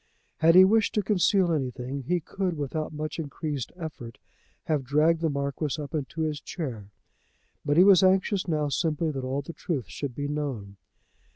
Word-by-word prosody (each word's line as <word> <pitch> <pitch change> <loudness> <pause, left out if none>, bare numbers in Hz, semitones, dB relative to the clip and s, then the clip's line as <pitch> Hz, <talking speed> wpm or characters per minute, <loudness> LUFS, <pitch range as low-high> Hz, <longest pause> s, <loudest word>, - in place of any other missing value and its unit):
Had 165 +1 +5
he 185 +1 +10
wished 220 +2 +2
to 210 - +2
conceal 195 -2 +2
anything, 135 -2 -3
he 180 0 +2
could 180 +1 -3
without 150 +2 -3
much 155 +1 -5
increased 145 -3 -4
effort 155 -9 -8 0.5
have 150 -4 0
dragged 155 +5 +2
the 165 - +1
Marquis 140 0 -2
up 145 0 -7
into 155 +1 -3
his 155 -2 -1
chair; 120 - -6 0.7
but 145 +1 +1
he 180 - +8
was 195 -3 +7
anxious 190 +1 +2
now 155 -3 0
simply 155 +2 0
that 135 -3 -5
all 135 +2 -2
the 170 - -8
truth 145 - -4
should 140 -4 -5
be 145 +1 -3
known. 135 -10 -4
150 Hz, 175 wpm, -27 LUFS, 140-170 Hz, 0.7 s, he